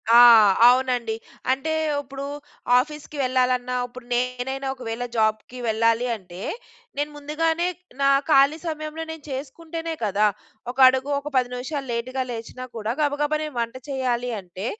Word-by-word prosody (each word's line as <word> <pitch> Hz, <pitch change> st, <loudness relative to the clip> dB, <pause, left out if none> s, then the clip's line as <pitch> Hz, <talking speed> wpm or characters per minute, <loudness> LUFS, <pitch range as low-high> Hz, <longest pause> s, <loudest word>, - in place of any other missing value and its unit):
ఆ! -, -, +10 dB, 0.5 s
అవునండి. 245 Hz, -3 st, +2 dB, 0.4 s
అంటే 275 Hz, +4 st, -1 dB, 0.3 s
ఇప్పుడు 275 Hz, 0 st, -7 dB, 0.5 s
ఆఫీస్‌కి 300 Hz, +2 st, -5 dB
వెళ్ళాలన్నా 250 Hz, -1 st, +1 dB
ఇప్పుడు 245 Hz, 0 st, -12 dB
నేనైనా 250 Hz, +2 st, -2 dB
ఒకవేళ 240 Hz, -1 st, -5 dB
జాబ్‌కి 220 Hz, +2 st, 0 dB
వెళ్ళాలి 230 Hz, +2 st, +2 dB
అంటే 180 Hz, -2 st, -12 dB, 0.6 s
నేను 290 Hz, +1 st, -1 dB
ముందుగానే 320 Hz, +3 st, 0 dB, 0.4 s
నా 275 Hz, -, +5 dB, 0.2 s
ఖాళీ 280 Hz, +1 st, +5 dB
సమయంలో 310 Hz, 0 st, -4 dB
నేను 320 Hz, -2 st, -9 dB
చేసుకుంటేనే 325 Hz, +5 st, -5 dB
కదా! 210 Hz, +1 st, +3 dB, 0.4 s
ఒక 255 Hz, -, -19 dB
అడుగు 260 Hz, +2 st, +2 dB
ఒక 295 Hz, -, -6 dB
10 250 Hz, -1 st, +3 dB
నిమిషాలు 270 Hz, +2 st, -4 dB
లేట్‌గా 255 Hz, +3 st, -2 dB
లేచినా 235 Hz, +2 st, -7 dB
కూడా 220 Hz, +1 st, -2 dB
గబగబా 295 Hz, +1 st, +1 dB
నేను 305 Hz, -3 st, -6 dB
వంట 230 Hz, +1 st, -2 dB
చేయాలి 250 Hz, -2 st, -1 dB
అంటే 185 Hz, +1 st, -8 dB
255 Hz, 135 wpm, -24 LUFS, 240-290 Hz, 0.6 s, ఆ